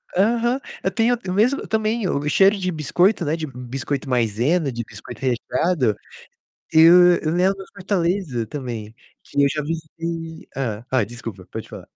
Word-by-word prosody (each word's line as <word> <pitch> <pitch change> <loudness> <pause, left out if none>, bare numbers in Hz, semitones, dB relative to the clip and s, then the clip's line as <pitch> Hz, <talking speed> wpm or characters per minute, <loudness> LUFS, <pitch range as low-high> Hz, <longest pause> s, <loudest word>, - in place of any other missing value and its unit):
Aham. 235 +6 +2 0.2
Eu - - +1
tenho 240 +1 +2
o 180 - -1
mesmo 240 +8 +2
também, 220 -1 0
o 145 -1 -1
cheiro 195 +5 +5
de 185 -1 -1
biscoito, 175 +4 +2
né, 155 +3 0
de 160 -1 -4
biscoito 130 +2 -4
Maizena, 125 - +1
de 120 0 -4
biscoito 125 - -11
recheado. 130 - +1 0.8
Eu 175 +2 +7
eu 155 - 0
lembro 190 +3 +1
Fortaleza, 180 - -1
também, 115 -5 -6 0.3
que 140 - -2
eu 140 - +5
já 150 +1 -2
visitei 165 +1 -5
Hã. 115 -4 -3
Ah, 130 -5 +2
desculpa, 115 -4 -8
pode - - -7
falar. - - -10
160 Hz, 155 wpm, -22 LUFS, 125-185 Hz, 0.8 s, Eu